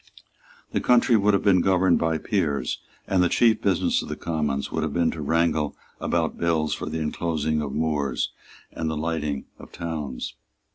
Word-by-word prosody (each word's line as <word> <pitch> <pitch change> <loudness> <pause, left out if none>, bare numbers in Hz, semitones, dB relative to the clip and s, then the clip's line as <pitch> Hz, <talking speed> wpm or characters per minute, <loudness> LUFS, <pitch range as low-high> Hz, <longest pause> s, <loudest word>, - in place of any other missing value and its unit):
The - - 0
country 125 -1 +4
would 105 -1 +4
have 100 - 0
been 95 -3 +5
governed 95 -1 +3
by 80 -1 +1
Peers; 80 -6 -1 0.3
and 95 -2 +2
the 90 - +3
chief 115 +1 +3
business 95 -4 +2
of - - -8
the - - -3
Commons 75 -4 -2
would - - -1
have 75 -2 -2
been 85 -1 +2
to 80 - -6
wrangle 80 0 +1 0.2
about - - -1
bills 80 -2 +1
for - - -4
the - - -3
inclosing 80 -1 -1
of 70 -2 -3
moors 75 -3 -1 0.4
and 80 -1 -3
the 80 - -2
lighting 75 -3 -2
of - - -12
towns. 75 -6 -4
80 Hz, 180 wpm, -25 LUFS, 75-90 Hz, 0.4 s, been